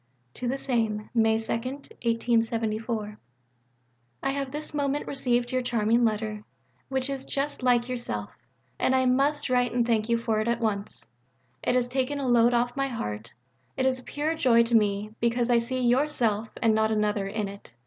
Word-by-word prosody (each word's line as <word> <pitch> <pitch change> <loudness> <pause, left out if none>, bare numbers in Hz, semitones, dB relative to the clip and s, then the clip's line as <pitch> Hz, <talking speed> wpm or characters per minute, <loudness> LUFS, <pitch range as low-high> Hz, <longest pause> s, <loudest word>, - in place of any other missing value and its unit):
(To 250 - -4
the 265 +3 0
same.) 225 -6 -1
May 225 -2 +3
2. 230 +4 -3 2.4
I - - +1
have 275 -1 -3
this 300 +2 -6
moment 285 0 -1
received 245 -2 0
your 255 0 +1
charming 235 -1 +2
letter, 215 -1 -1 0.5
which 265 -1 -1
is 275 -1 -4
just 280 +1 -3
like 245 -1 +3
yourself. 175 - -4 0.5
And 260 - +2
I 260 0 +3
must 280 +4 +2
write 245 -2 +1
and 240 -1 +2
thank 225 -1 +1
you 235 - +3
for 230 -2 0
it 215 - -1
at 235 0 +1
once. 210 -3 -3 0.5
It - - +1
has 250 -1 +2
taken 265 +3 -1
a 275 -2 -2
load 240 0 +4
off 240 +1 +1
my 275 -1 0
heart. 110 - -5 0.5
It 260 - +1
is 260 -1 +1
a - - -14
pure 300 +4 -2
joy 245 -7 +4
to 230 0 +1
me: 210 -1 +2
because 235 +1 +1
I 235 - +5
see 255 +2 -2
yourself 240 -4 +1
(and 225 -1 +4
not 220 0 +2
another) 210 -2 0
in 210 +1 -2
it. 200 -9 -11
240 Hz, 180 wpm, -27 LUFS, 220-260 Hz, 2.4 s, I